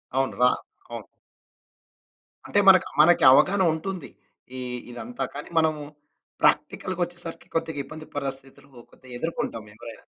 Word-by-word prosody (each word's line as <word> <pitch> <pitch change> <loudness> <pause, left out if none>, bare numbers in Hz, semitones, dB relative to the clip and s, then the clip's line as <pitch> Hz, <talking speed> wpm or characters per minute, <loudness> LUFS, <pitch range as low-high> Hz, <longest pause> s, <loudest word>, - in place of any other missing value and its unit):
అవును. 135 0 +1
రా 125 - +7 0.4
అవును. - - -7 1.4
అంటే 205 - +2
మన 190 -1 +10 0.2
మనకి 170 +1 +5
అవగాహన 190 +8 +5
ఉంటుంది. 185 +3 -5 0.5
ఈ - - -4 0.3
ఇదంతా 235 - -5
కానీ, 145 - -7
మనం 160 -1 +3 0.7
ప్రాక్టికల్‌గా 185 -1 +1
వచ్చేసరికి 175 -1 -7
కొద్దిగా 160 -2 -1
ఇబ్బంది 155 +1 -10
పరస్థితులు 135 0 -6 0.2
కొద్దిగా 130 -1 -14
ఎదుర్కొంటాం 140 -8 -3
ఎవరైనా. 115 +1 -11
155 Hz, 120 wpm, -25 LUFS, 135-175 Hz, 1.4 s, మన